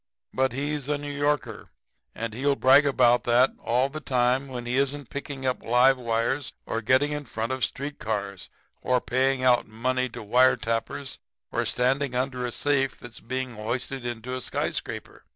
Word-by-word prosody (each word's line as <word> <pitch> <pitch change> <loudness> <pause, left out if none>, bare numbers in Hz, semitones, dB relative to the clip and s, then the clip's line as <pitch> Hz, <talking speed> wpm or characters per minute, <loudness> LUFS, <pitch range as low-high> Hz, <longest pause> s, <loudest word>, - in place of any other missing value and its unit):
But 130 0 +1
he's 145 +1 -3
a 150 - +1
New 145 0 -6
Yorker, 145 0 -1 0.5
and 115 -1 -4
he'll 140 +4 +1
brag 135 +2 +6
about 125 -3 +4
that 125 +2 +4
all 125 +3 +2
the 155 +3 -7
time 130 -1 +1
when 125 -2 -6
he 120 +1 -1
isn't 140 -1 -1
picking 140 -1 -6
up 130 -1 0
live 125 +3 +4
wires 120 +4 -1
or 115 - -2
getting 130 +6 +3
in 150 0 -3
front 115 0 -3
of 130 -1 -2
street 140 +2 -3
cars 100 -3 -4 0.3
or 125 0 +2
paying 130 +1 +1
out 125 -1 +4
money 130 +4 -1
to 115 - -8
wire 125 +5 +5
tappers 115 +4 -3 0.3
or - - 0
standing 130 +1 +1
under 125 -1 -1
a - - -4
safe 135 0 0
that's 120 -2 -10
being 130 +2 -4
hoisted 120 +4 -4
into 120 +1 -5
a 130 - -3
skyscraper. - - -4
130 Hz, 175 wpm, -26 LUFS, 120-135 Hz, 0.5 s, brag